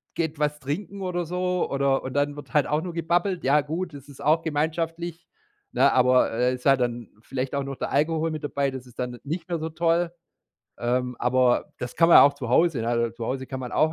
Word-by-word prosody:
geht 160 Hz, -2 st, -2 dB
was 150 Hz, 0 st, 0 dB
trinken 195 Hz, +8 st, -5 dB
oder 175 Hz, -2 st, -2 dB
so, 180 Hz, +1 st, -1 dB
oder 140 Hz, -1 st, +1 dB
und 130 Hz, -, -5 dB
dann 145 Hz, 0 st, 0 dB
wird 145 Hz, -, -11 dB
halt 150 Hz, -, +3 dB
auch 150 Hz, +1 st, 0 dB
nur 175 Hz, -1 st, -6 dB
gebabbelt 175 Hz, +3 st, 0 dB
ja 140 Hz, +3 st, +4 dB
gut, 165 Hz, +3 st, -4 dB
das 140 Hz, 0 st, -11 dB
ist 140 Hz, -, -13 dB
auch 155 Hz, +3 st, +3 dB
gemeinschaftlich, 165 Hz, +2 st, -2 dB, 0.5 s
ne, 140 Hz, +1 st, +4 dB
aber, 125 Hz, 0 st, +4 dB
äh, 125 Hz, +3 st, +1 dB
ist 125 Hz, -, -13 dB
halt 135 Hz, -2 st, +5 dB
dann 120 Hz, -2 st, -2 dB
vielleicht 130 Hz, +2 st, -4 dB
auch 140 Hz, 0 st, 0 dB
noch 135 Hz, -, -5 dB
der -, -, -4 dB
Alkohol 160 Hz, +2 st, +1 dB
mit 155 Hz, -, -5 dB
dabei, 140 Hz, -2 st, -1 dB
das 130 Hz, -1 st, -7 dB
ist 120 Hz, -, -18 dB
dann 125 Hz, -1 st, -3 dB
n -, -, -14 dB
nicht 165 Hz, +4 st, -4 dB
mehr 170 Hz, -2 st, -1 dB
so 160 Hz, -, -3 dB
toll, 165 Hz, +1 st, +1 dB, 0.7 s
ähm, 125 Hz, +1 st, -1 dB
aber 125 Hz, 0 st, +2 dB
das 125 Hz, -, -5 dB
kann 165 Hz, +1 st, +4 dB
man 170 Hz, -, +9 dB
ja -, -, +10 dB
auch 140 Hz, -, +6 dB
zu 130 Hz, -5 st, -6 dB
Hause, 160 Hz, 0 st, +3 dB
ne? 115 Hz, 0 st, 0 dB
Zu 115 Hz, -1 st, -5 dB
Hause 130 Hz, 0 st, -3 dB
kann 130 Hz, -1 st, -6 dB
man 125 Hz, -, -5 dB
auch 155 Hz, 0 st, +2 dB
145 Hz, 235 wpm, -25 LUFS, 130-165 Hz, 0.7 s, ja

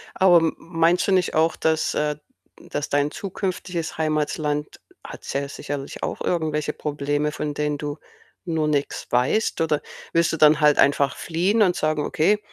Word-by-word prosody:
Aber 185 Hz, -2 st, +6 dB
m 160 Hz, -1 st, 0 dB
meinst 165 Hz, +2 st, +1 dB
du -, -, +2 dB
nicht 185 Hz, -1 st, +2 dB
auch, 160 Hz, +1 st, +3 dB
dass, 160 Hz, 0 st, 0 dB
äh 150 Hz, -1 st, -1 dB, 0.5 s
dass 145 Hz, -, -3 dB
dein 145 Hz, +1 st, +1 dB
zukünftiges 180 Hz, -4 st, -4 dB
Heimatland 150 Hz, -1 st, -1 dB, 0.2 s
hat -, -, -10 dB
ja 140 Hz, 0 st, -1 dB
sicherlich 140 Hz, -1 st, -6 dB
auch -, -, -3 dB
irgendwelche 155 Hz, -3 st, -1 dB
Probleme, 145 Hz, 0 st, -2 dB
von 150 Hz, -1 st, -3 dB
denen 150 Hz, -1 st, -1 dB
du 145 Hz, 0 st, -4 dB, 0.5 s
nur 160 Hz, -3 st, 0 dB
nix 145 Hz, -1 st, -1 dB
weißt? 130 Hz, -, +1 dB
Oder 150 Hz, -2 st, +1 dB, 0.3 s
willst 170 Hz, -1 st, +3 dB
du -, -, -1 dB
dann 150 Hz, 0 st, +6 dB
halt 150 Hz, -1 st, +5 dB
einfach 140 Hz, -1 st, +3 dB
fliehen 185 Hz, +7 st, 0 dB
und 180 Hz, -2 st, +2 dB
sagen: 155 Hz, -1 st, 0 dB
„Okay, 205 Hz, +7 st, +2 dB
155 Hz, 165 wpm, -23 LUFS, 150-165 Hz, 0.5 s, Aber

